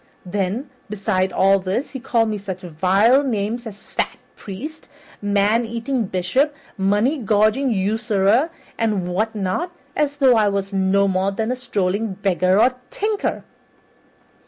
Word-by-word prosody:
Then, 205 +8 -2 0.2
besides 195 -2 0
all 195 +2 +4
this, 195 +9 -2
he 265 - -6
called 230 -2 +1
me 210 -1 -2
such 190 -2 -6
vile 190 - +3
names 230 -1 -2
as 205 -2 -12
'fat - - -1 0.2
priest,' 280 +11 -8 0.3
'man 205 +3 +2
eating 235 +2 -2
bishop,' 225 +12 0 0.2
'money 205 +9 +1
gorging 215 +4 +2
usurer,' 215 - +2 0.3
and 210 -6 0
what 215 +5 -1
not, 210 - -2 0.2
as 290 -1 0
though 265 -4 +5
I 210 -2 +4
were 200 0 0
no 195 +1 +2
more 190 +1 +1
than 220 +4 -2
a - - 0
strolling 210 -4 -1
beggar 185 0 +2
or 255 +3 +3
tinker." 425 0 -2
210 Hz, 140 wpm, -21 LUFS, 195-245 Hz, 0.3 s, though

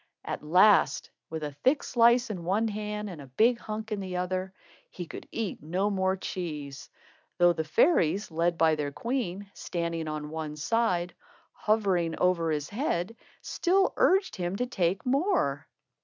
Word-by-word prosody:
At - - -4
last, 180 -1 +4 0.2
with 160 -1 -5
a 150 - -3
thick 260 - +1
slice 235 0 +4
in 180 -5 -5
one 200 +6 +1
hand 210 0 -4
and 175 -7 -8
a 140 - -11
big 230 - +2
hunk 220 0 -6
in 210 - -1
the 185 -2 -4
other, 185 +1 -2 0.4
he 175 - -7
could - - -9
eat 225 -4 -3
no 185 +7 -1
more 190 -1 +1
cheese; 150 -8 -6 0.5
though 175 0 +5
the 160 - -2
fairies, 190 - +2
led 165 +1 0
by 160 -1 +4
their 150 -2 -2
queen, 205 - -3
standing 170 -2 -3
on 150 -1 -5
one 155 -1 -5
side, 180 +1 0
or - - -31 0.4
hovering 190 -6 0
over 175 -3 +2
his 150 -2 -2
head, 205 - -2 0.3
still 380 +2 +1
urged 380 +1 +2
him 175 +1 -2
to 245 - -1
take 190 -6 -1
more. 260 - +1
185 Hz, 165 wpm, -28 LUFS, 160-215 Hz, 0.5 s, though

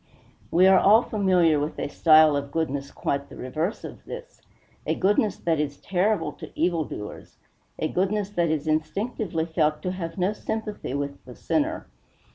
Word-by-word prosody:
We 180 +2 +4
are 190 -1 +7
all 220 +4 +6
familiar 180 -7 +2
with 150 +2 -3
a - - -2
style 155 0 +5
of 140 0 -3
goodness 140 -4 -2
quite 140 0 -3
the - - -11
reverse 155 - -3
of - - -9
this - - -9 0.5
a - - +1
goodness 205 +2 +2
that 165 -3 0
is 145 -1 -2
terrible 195 0 0
to - - -10
evil 170 -2 +1
doers 105 -5 -9 0.4
a 155 - -1
goodness 195 +3 -1
that 175 -4 +1
is 155 -1 -1
instinctively 165 +2 -1
felt 155 -2 0
to 180 - -1
have 170 -2 -5
no 185 +3 +1
sympathy 210 - -4
with 140 0 -4
the 125 -1 -11
sinner. 315 +1 -1
170 Hz, 170 wpm, -25 LUFS, 150-200 Hz, 0.5 s, are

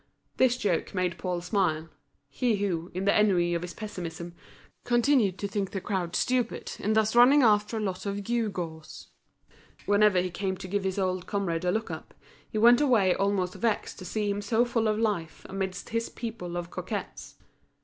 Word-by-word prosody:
This 250 -1 +4
joke 195 -5 -1
made 180 -2 -1
Paul 180 -2 -2
smile, 175 -4 0 0.4
he 220 - 0
who, 180 -4 -2
in 185 +1 -2
the 200 - +4
ennui 180 -5 +3
of 170 - -1
his 180 0 -7
pessimism, 175 -5 -6 0.5
continued 240 -5 +3
to 200 - -3
think 200 -1 -2
the 195 - -4
crowd 185 -3 -3
stupid 250 -2 0
in 215 - 0
thus 220 +1 +2
running 260 +4 +7
after 210 0 +3
a - - -2
lot 190 -1 -3
of 200 0 -3
gew 230 0 0
gaws. 160 -5 -7 0.8
Whenever 205 -2 +4
he 180 0 -1
came 190 +1 -2
to 185 - -8
give 200 +1 -2
his 190 0 -1
old 185 -1 -1
comrade 180 -4 -1
a 180 - +2
look 220 +4 -2
up, - - -8 0.3
he - - -4
went 240 +4 +6
away 225 -10 +4
almost 195 -2 0
vexed 230 -3 -2
to 185 - -8
see 210 +3 -2
him 205 0 -1
so 230 +3 +2
full 230 -2 0
of 215 0 +1
life 205 -8 -2
amidst 190 -1 -4
his 230 0 -2
people 210 -7 -6
of 175 0 -5
coquettes. - - -6
200 Hz, 190 wpm, -28 LUFS, 180-220 Hz, 0.8 s, running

